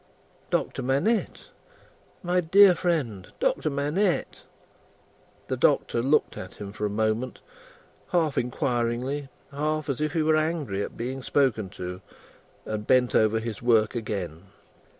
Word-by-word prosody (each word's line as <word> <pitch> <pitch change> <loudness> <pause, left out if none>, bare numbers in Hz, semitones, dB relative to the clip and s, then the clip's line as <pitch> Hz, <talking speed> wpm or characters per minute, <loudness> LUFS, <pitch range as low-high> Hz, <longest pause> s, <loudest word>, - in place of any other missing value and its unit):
"Doctor - - -1
Manette. 140 - 0 0.7
My 180 +1 +2
dear 190 +3 +7
friend, 150 - -1
Doctor - - +1
Manette!" 150 +7 0 1.1
The - - -1
Doctor 115 - +2
looked 140 +5 +2
at 95 - -8
him 100 -1 -7
for 105 0 -2
a - - -4
moment 110 +4 -1 0.7
half 160 -5 +1
inquiringly, 125 +3 -1 0.2
half 155 +1 -2
as 135 +1 -2
if 155 +1 -1
he 160 -2 +1
were 155 0 +3
angry 155 -11 -1
at - - -5
being 130 +3 -4
spoken 125 -8 +1
to 90 0 -6 0.6
and 105 -1 -4
bent 125 -1 +3
over 110 +1 +3
his 110 -2 -5
work 115 -3 +3
again. 95 -7 -4
130 Hz, 130 wpm, -26 LUFS, 110-155 Hz, 1.1 s, dear